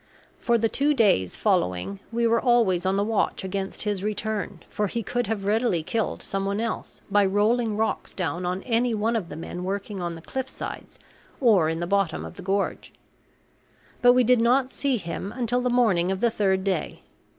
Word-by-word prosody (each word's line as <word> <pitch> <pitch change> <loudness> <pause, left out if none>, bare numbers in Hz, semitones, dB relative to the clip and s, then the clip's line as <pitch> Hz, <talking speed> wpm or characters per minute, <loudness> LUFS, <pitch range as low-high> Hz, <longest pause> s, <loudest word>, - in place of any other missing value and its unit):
For 235 -1 +2
the 225 0 +2
two 290 +6 +1
days 195 - +3
following 90 +2 0
we 235 0 0
were 230 0 +3
always 210 -8 +3
on 190 - +2
the 200 - +2
watch 215 -2 0
against 190 0 -3
his 205 -2 -2
return, 210 -4 -3
for 210 -1 -1
he 230 +4 -3
could 245 +2 -1
have 205 -2 -2
readily 210 -5 +1
killed 220 +5 -2
some 195 0 -2
one 200 +1 -1
else 230 0 -4
by 205 0 +5
rolling 210 +3 +2
rocks 220 +1 -2
down 175 -1 -2
on 180 +2 -2
any 240 0 +1
of 220 -3 -1
the - - -7
men 175 +2 -6
working 200 +1 -4
on 170 -1 -3
the 165 - -10
cliff 265 +5 -4
sides - - -7 0.4
or 205 - +4
in 165 +1 -2
the - - 0
bottom 195 -3 0
of - - -9
the - - -9
gorge. 195 +2 -2 1.1
But 245 0 +7
we 250 0 +4
did 245 0 +4
not 255 +3 +3
see 275 -3 0
him 190 +1 -5
until 245 0 0
the 250 - 0
morning 205 -8 +3
of 190 - -2
the 235 +1 +2
third 190 -3 +1
day. 190 -5 -2
205 Hz, 195 wpm, -25 LUFS, 190-235 Hz, 1.1 s, But